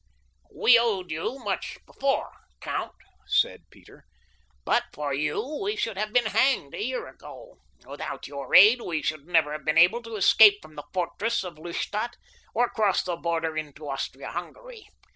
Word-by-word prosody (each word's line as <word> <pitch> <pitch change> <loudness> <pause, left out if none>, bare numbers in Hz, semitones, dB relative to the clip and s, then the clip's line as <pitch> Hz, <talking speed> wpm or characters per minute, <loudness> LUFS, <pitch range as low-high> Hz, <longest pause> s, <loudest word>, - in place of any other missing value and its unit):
"We 235 -1 +5
owed 195 -7 -1
you 165 +12 -3
much 210 -7 -4
before, 275 0 -1 0.3
count," - - -4 0.3
said - - 0
Peter. - - -19 0.6
"But 240 - +2
for 145 -2 -4
you 150 - -2
we 415 +2 -1
should 425 - -2
have 210 +2 -3
been 245 0 +3
hanged 235 - +1
a - - -4
year 255 +2 -3
ago—without - - -10
your 140 -2 -4
aid 215 +7 +8
we 160 -7 -3
should 155 -1 -3
never 165 -4 +2
have 150 0 -6
been 155 +2 0
able 180 +8 +5
to 230 -1 -8
escape 205 0 +7
from 155 -4 -16
the 145 - -9
fortress 195 +6 -1
of 170 -4 -9
Lustadt 210 +7 -4 0.4
or 240 +2 +3
cross 210 -4 +1
the 180 -2 -3
border 165 -1 -2
into 155 -1 -6
Austria 135 -1 -5
Hungary. - - -9
190 Hz, 160 wpm, -26 LUFS, 155-235 Hz, 0.6 s, aid